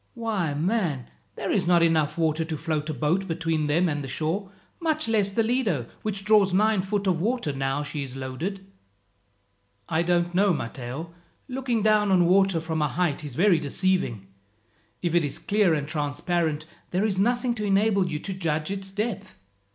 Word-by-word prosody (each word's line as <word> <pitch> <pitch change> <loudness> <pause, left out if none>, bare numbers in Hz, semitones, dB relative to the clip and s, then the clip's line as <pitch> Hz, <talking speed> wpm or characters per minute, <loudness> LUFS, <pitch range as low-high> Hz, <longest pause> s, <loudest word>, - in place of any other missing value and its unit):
Why, 210 -10 -1
man, 160 - -1 0.2
there - - -3
is - - +1
not 175 -1 +5
water - - +7
enough 155 -2 +2 0.3
to 160 - -2
float 155 0 -2
a - - -1
boat 175 +7 0
between 165 -2 -1
them 170 +5 +2
and 145 -3 -2
the - - -5
shore, 165 +8 -2 0.3
much 315 -4 0
less 210 -3 +2
the 225 +3 +1
Lido, 220 - 0 0.2
which 200 -2 -3
draws 205 -3 +4
nine 215 0 +3
foot 200 +1 -2
of 180 -4 +1
water 225 - 0
now 135 +1 -1
she 145 0 -4
is 135 -2 -6
loaded." 155 +10 -5 1.2
"I 160 - +1
don't 175 0 +1
know, 195 +1 +4
Matteo. 130 +8 -6 0.3
Looking 250 -4 -1
down 215 -1 +4
on 180 -2 +4
water 190 -1 +4
from 160 -1 -2
a 150 - +3
height 160 -2 -1
is 145 -5 -6
very 180 -1 +4
deceiving. 150 - 0 0.8
If 170 -2 0
it 175 -1 +4
is 145 - -3
clear 200 -5 +2
and 145 -1 -3
transparent, 155 +1 -1 0.2
there 185 +4 0
is 195 -3 0
nothing 240 +3 +2
to 215 -3 -4
enable 200 -1 +2
you 155 - -2
to 195 - -4
judge 160 -2 -2
its 195 -1 -5
depth. 210 +1 -4
175 Hz, 180 wpm, -26 LUFS, 155-205 Hz, 1.2 s, water